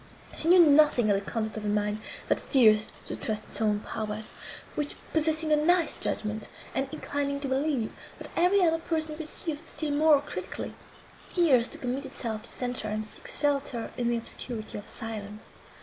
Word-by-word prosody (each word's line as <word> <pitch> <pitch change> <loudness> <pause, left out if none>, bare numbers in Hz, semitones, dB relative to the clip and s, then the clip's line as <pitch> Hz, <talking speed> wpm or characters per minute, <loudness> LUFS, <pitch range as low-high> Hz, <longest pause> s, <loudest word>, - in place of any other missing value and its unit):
She 320 - 0
knew 350 0 +8
nothing 285 -7 +5
of - - +4
the 195 - 0
conduct 220 -1 -2
of 215 - -5
a - - -1
mind, 210 0 0 0.3
that - - +2
fears 220 -5 +4
to - - -4
trust 215 -1 -1
its - - -5
own 210 -1 +2
powers; 215 0 -4 0.4
which, 295 -1 -1 0.2
possessing 315 0 +2
a - - +7
nice 330 +2 +3
judgment, 215 0 -2 0.2
and 270 0 -1
inclining 285 -2 -2
to 280 - -2
believe, 265 -3 0 0.2
that - - -9
every 365 +3 +4
other 325 -1 +3
person 315 -2 -2
perceives 310 0 -2
still 310 -2 -3
more 300 0 +5
critically, 285 - -5 0.6
fears 275 -10 +4
to - - -7
commit 265 +2 -3
itself 220 -3 -4
to 230 - -9
censure, 245 -3 -1
and 215 +1 -2
seeks 215 - -1
shelter 280 -5 0
in 240 -2 0
the 240 - +1
obscurity 230 -1 -3
of 205 - -12
silence. 215 -1 -7
265 Hz, 180 wpm, -28 LUFS, 220-310 Hz, 0.6 s, knew